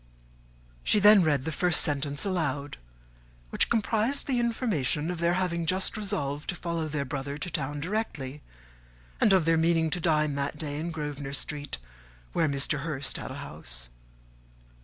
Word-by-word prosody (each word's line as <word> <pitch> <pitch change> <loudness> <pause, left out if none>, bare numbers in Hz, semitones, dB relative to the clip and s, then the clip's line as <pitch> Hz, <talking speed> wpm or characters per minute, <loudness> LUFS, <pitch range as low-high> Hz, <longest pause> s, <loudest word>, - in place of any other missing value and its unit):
She 210 - +3
then 205 0 +8
read 145 -5 +2
the 160 - -1
first 175 +3 +3
sentence 145 +2 +1
aloud, 145 -7 -2 0.7
which - - +2
comprised 225 +4 +1
the 255 -3 +1
information 190 - 0
of 175 - -5
their 170 +1 +2
having 170 -3 -1
just 185 +4 +3
resolved 180 -9 -3
to 180 - +1
follow 170 -2 -3
their 150 -2 -2
brother 140 +1 -4
to 170 +4 -5
town 145 0 -2
directly, 150 -7 -3 0.8
and 215 - +5
of 185 -4 +4
their 165 0 +4
meaning 165 -1 +2
to 180 - +1
dine 155 -3 +2
that 140 +1 -2
day 145 -1 -3
in 165 +2 -3
Grosvenor 145 -3 -5
Street, 145 - -2 0.6
where 160 - +2
Mr. 140 +1 0
Hurst 140 -3 -2
had - - -6
a - - -6
house. - - -5
155 Hz, 160 wpm, -28 LUFS, 145-180 Hz, 0.8 s, then